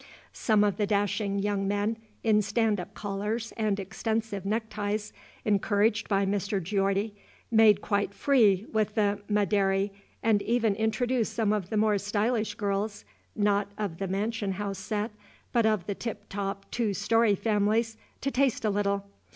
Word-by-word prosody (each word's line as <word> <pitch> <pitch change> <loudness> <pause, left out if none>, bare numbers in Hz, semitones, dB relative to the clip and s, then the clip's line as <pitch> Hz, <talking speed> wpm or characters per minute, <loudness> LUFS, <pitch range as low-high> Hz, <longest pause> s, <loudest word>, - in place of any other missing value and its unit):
Some 215 -3 +3
of 205 -1 +1
the 210 -2 +1
dashing 200 0 0
young 200 -1 0
men 205 +2 0 0.3
in 215 -2 +4
stand 210 0 +1
up 180 - -8
collars 210 +3 -3
and 210 -3 0
extensive 210 0 -3
neckties, 210 -1 -2 0.3
encouraged 210 +2 +2
by 195 -1 +2
Mr. 200 0 0
Geordie, 195 +3 0 0.4
made 220 -3 +6
quite 200 -1 0
free 215 -5 +3
with 215 -1 0
the 205 -2 +1
"Ma, 210 -1 +3
dary," 195 0 +1 0.3
and 220 -2 +3
even 230 -2 +2
induced 220 +3 0
some 220 -3 +2
of 195 -4 -2
the 220 - -1
more 210 -1 +3
stylish 215 +3 0
girls 200 - -2 0.3
not 205 -1 +1
of 200 -6 -3
the 195 - -2
mansion 205 +1 -1
house 195 0 -4
set, 210 +3 -2 0.4
but 235 -3 +3
of 215 -5 +1
the 200 - -2
tip 230 +3 -6
top 195 0 -4
two 220 -4 0
story 225 -1 +3
families 220 +2 +1 0.3
to 275 - -1
taste 260 -3 +1
a 210 - +3
little. 200 0 0
205 Hz, 160 wpm, -28 LUFS, 200-220 Hz, 0.4 s, made